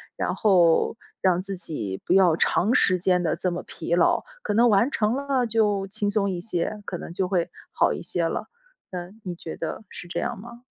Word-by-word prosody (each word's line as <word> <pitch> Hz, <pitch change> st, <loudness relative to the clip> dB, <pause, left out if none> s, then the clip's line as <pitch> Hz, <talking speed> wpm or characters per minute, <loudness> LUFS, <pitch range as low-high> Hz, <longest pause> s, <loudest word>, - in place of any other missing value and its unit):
然 -, -, -1 dB
后 180 Hz, -6 st, +4 dB, 0.3 s
让 180 Hz, -2 st, +3 dB
自 195 Hz, 0 st, -5 dB
己 110 Hz, -, -5 dB
不 -, -, +2 dB
要 185 Hz, -4 st, +5 dB
长 200 Hz, +6 st, +2 dB
时 185 Hz, -1 st, +4 dB
间 180 Hz, 0 st, +2 dB
地 160 Hz, -, +1 dB
这 180 Hz, -, -1 dB
么 175 Hz, -, -4 dB
疲 170 Hz, -, -3 dB
劳， 175 Hz, -, +3 dB, 0.2 s
可 -, -, -1 dB
能 235 Hz, +3 st, +5 dB
完 220 Hz, +6 st, +3 dB
成 215 Hz, -2 st, +1 dB
了 275 Hz, -2 st, 0 dB
就 210 Hz, -3 st, +1 dB
轻 205 Hz, +1 st, -1 dB
松 200 Hz, -1 st, +1 dB
一 180 Hz, -2 st, -2 dB
些， 210 Hz, +2 st, -3 dB
可 175 Hz, -, -4 dB
能 -, -, -8 dB
就 185 Hz, +2 st, -1 dB
会 180 Hz, -2 st, 0 dB, 0.2 s
好 -, -, +2 dB
一 -, -, -5 dB
些 170 Hz, -1 st, -1 dB
了。 -, -, -4 dB, 0.4 s
那 175 Hz, -1 st, -5 dB
你 180 Hz, -, -4 dB
觉 165 Hz, -1 st, -7 dB
得 165 Hz, +6 st, -4 dB
是 175 Hz, -, -9 dB
这 175 Hz, -, -3 dB
样 240 Hz, -1 st, -2 dB
吗？ 240 Hz, +3 st, -12 dB
190 Hz, 230 characters per minute, -25 LUFS, 175-215 Hz, 0.4 s, 要